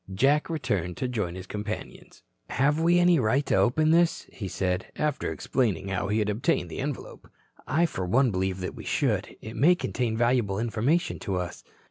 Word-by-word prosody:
Jack 140 - +2
returned 105 - -2
to 130 - -1
join 105 -8 -2
his 95 0 -7
companions. 105 +2 -7 0.3
"Have 145 +4 +2
we 170 +2 +4
any 175 -2 +5
right 130 +5 +2
to - - 0
open 130 +11 +3
this?" 170 0 +3
he 100 - -5
said, 90 0 -1
after 150 -1 -1
explaining 100 -7 -1
how 95 0 -1
he 105 +2 0
had 105 -1 +1
obtained 105 +5 0
the - - -6
envelope. 145 -1 -6 0.4
"I 165 +4 +3
for 95 - -3
one 125 +6 +3
believe 95 0 -1
that 90 - -4
we - - -9
should. - - -1
It 110 +1 -8
may 175 +6 +5
contain 120 -9 -2
valuable 120 -5 +2
information 120 +9 0
to 95 - -3
us." 90 -1 -4
115 Hz, 185 wpm, -27 LUFS, 95-145 Hz, 0.4 s, any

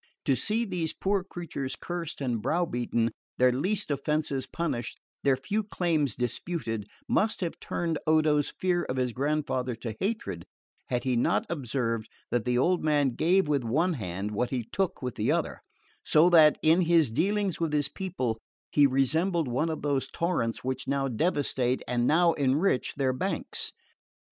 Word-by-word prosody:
To 135 - +3
see 215 - 0
these 175 -6 -2
poor 195 -1 0
creatures 165 -8 -5
cursed 175 -4 -5
and 120 -5 -1
brow 175 +8 +1
beaten, 120 -4 -1 0.3
their 125 0 +5
least 185 +8 -1
offences 140 -1 -1
punished, 125 -7 -3 0.3
their 135 -2 +3
few 200 +11 -1
claims 165 - 0
disputed, 120 - -3 0.2
must 215 0 +1
have 170 -2 -3
turned 165 -3 -2
Odo's 155 -2 +3
fear 180 -1 +2
of 130 - -3
his 125 -2 0
grandfather 130 -3 -1
to 115 -1 -6
hatred, 195 - -3 0.4
had 120 -1 -1
he 130 -2 +1
not 120 - +2
observed 120 -6 -2 0.2
that 120 -1 0
the 125 0 +1
old 175 +8 +2
man 145 -3 +3
gave 175 +8 +2
with 145 -3 +1
one 160 +11 +1
hand 100 - -4
what 120 +4 -1
he 125 -2 -2
took 190 -7 -1
with 125 -2 -2
the - - 0
other, - - -1 0.4
so 165 +4 +5
that, 155 -3 +7
in 160 +3 +5
his 165 -6 +4
dealings 200 - 0
with 165 -2 0
his 145 -2 +1
people, 140 - -3 0.3
he 145 -1 +6
resembled 160 +5 +1
one 130 +7 0
of 160 - -4
those 140 -2 0
torrents 165 -10 -1
which 130 +1 -3
now 140 0 0
devastate 130 -2 0
and 120 0 +1
now 170 +2 +4
enrich 140 +2 +1
their 135 -2 +1
banks. 185 +10 -2
145 Hz, 165 wpm, -28 LUFS, 125-170 Hz, 0.4 s, that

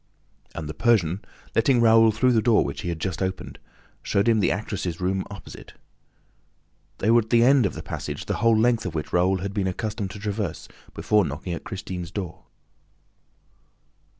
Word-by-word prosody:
And 80 -2 -5
the 80 - -5
Persian, 100 -5 +1 0.3
letting 120 +2 +3
Raoul 115 -1 +6
through 125 +4 +2
the 115 -2 +3
door 115 -1 +3
which 70 - -5
he 90 - -4
had 85 -2 -4
just 95 +2 -3
opened, 95 0 -4 0.4
showed 100 +3 0
him 115 -2 +4
the 95 - +2
actress' 95 -3 -3
room 95 +1 0
opposite. 100 - -11 1.2
They 110 - +1
were 120 - +6
at 110 - -12
the 115 -1 +5
end 130 -3 +5
of - - -7
the - - -7
passage - - -5
the - - -2
whole 115 -1 +3
length 115 -2 +2
of 85 - -6
which 75 - -4
Raoul 90 +1 +2
had 100 +1 -4
been 100 -2 -1
accustomed 100 +1 -3
to 100 +2 -9
traverse 105 -4 -4 0.3
before 105 -1 +2
knocking 75 +4 -4
at 85 - -7
Christine's 95 -5 -6
door. 90 -3 -6
100 Hz, 180 wpm, -24 LUFS, 90-115 Hz, 1.2 s, Raoul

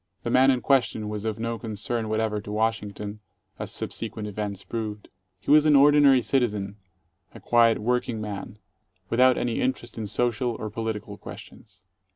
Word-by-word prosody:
The 120 - -2
man 130 +2 +5
in 130 -2 +2
question 120 -6 +1
was 105 0 -5
of 110 -2 -2
no 115 0 -3
concern 110 0 -3
whatever 110 -1 -1
to 105 - -8
Washington, 105 -1 -2 0.4
as - - -4
subsequent 110 -1 -4
events 100 -1 -4
proved. 105 +1 -5 0.3
He 105 - -2
was 150 +1 +6
an 150 - +6
ordinary 140 -2 +6
citizen, 105 -7 -1 0.6
a - - -9
quiet 115 -1 +4
work 125 +4 0
ing 115 -2 -3
man, 105 -1 -6 0.5
without 125 +2 +5
any 120 -2 -1
interest 120 -3 -2
in 110 - -3
social 120 +2 0
or 110 -1 -5
political 105 -2 -5
questions. 95 -3 -12
110 Hz, 165 wpm, -25 LUFS, 105-120 Hz, 0.6 s, was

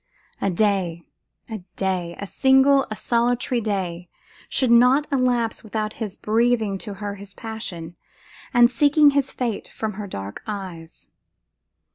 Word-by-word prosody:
a 200 - +1
day, 180 -3 0 0.4
a 220 -2 -5 0.2
day, 180 -3 -2
a 200 - -5
single, 265 +4 +4
a 215 - -4
solitary 240 +1 0
day, 180 -5 -3 0.4
should 255 -3 +2
not 250 +5 +5
elapse 250 -4 +1
without 215 0 -3
his 205 -3 -3
breathing 220 -2 +1
to 205 0 -6
her 205 +1 -5
his 200 0 -11
passion, 180 -7 -6 0.6
and 240 -1 +5
seeking 290 +3 +5
his 275 -1 0
fate 235 -5 -3
from 220 -1 -4
her 205 +1 -6
dark 100 - -7
eyes. 185 -6 -7
215 Hz, 135 wpm, -23 LUFS, 190-245 Hz, 0.6 s, not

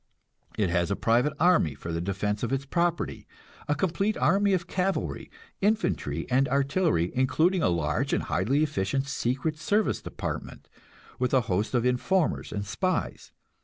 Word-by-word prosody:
It 100 -5 +1
has 85 0 +1
a 100 - 0
private 120 +8 +2
army 160 - +3
for 80 +4 -6
the 85 - -2
defense 100 +3 -2
of 120 - -2
its 135 0 -1
property 170 +3 -1 0.4
a 150 - +1
complete 190 +6 0
army 200 +1 +3
of 175 -2 0
cavalry, 190 +1 -2 0.3
infantry 215 +3 0
and 130 +2 +2
artillery, 140 - +1
including 160 +8 +2
a - - +3
large 80 -4 0
and - - +1
highly 130 - +1
efficient 135 -2 -1
secret 140 +4 -2
service 205 +6 +1
department, - - -6 0.5
with 125 +1 +1
a 130 - +5
host 105 +2 -1
of 120 0 +2
informers 150 +7 +1
and 100 -1 -3
spies. 185 - -2
135 Hz, 155 wpm, -27 LUFS, 105-175 Hz, 0.5 s, a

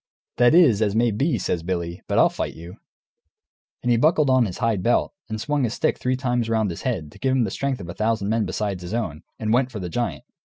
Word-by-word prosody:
"That 120 +5 +5
is 130 - +5
as 105 -1 +1
may 115 +1 +3
be," 135 +5 0
says 90 -3 -2
Billy, 85 0 -3
"but - - 0
I'll - - +6
fight - - -4
you." 85 +2 -10 1.1
And 120 - +1
he 120 - +4
buckled 150 +1 +3
on 130 -2 +4
his 90 - -6
hide 115 -5 0
belt, 120 - +1 0.2
and 110 0 -3
swung 145 +5 0
his 120 -2 -1
stick - - 0
three 125 +1 0
times 125 -3 -1
round 110 -4 +1
his 85 - -7
head, 90 - -3
to - - -16
give 130 0 +1
him 130 - +3
the 100 - -2
strength 140 -2 -2
of 85 - -8
a 85 - -6
thousand 110 -2 0
men 110 0 +1
besides 100 -4 -3
his 90 +5 -5
own, 85 -11 -3 0.2
and 110 0 -1
went 125 +1 +2
for 110 - -6
the 90 -2 -5
giant. 120 +7 -3
115 Hz, 250 wpm, -23 LUFS, 95-125 Hz, 1.1 s, I'll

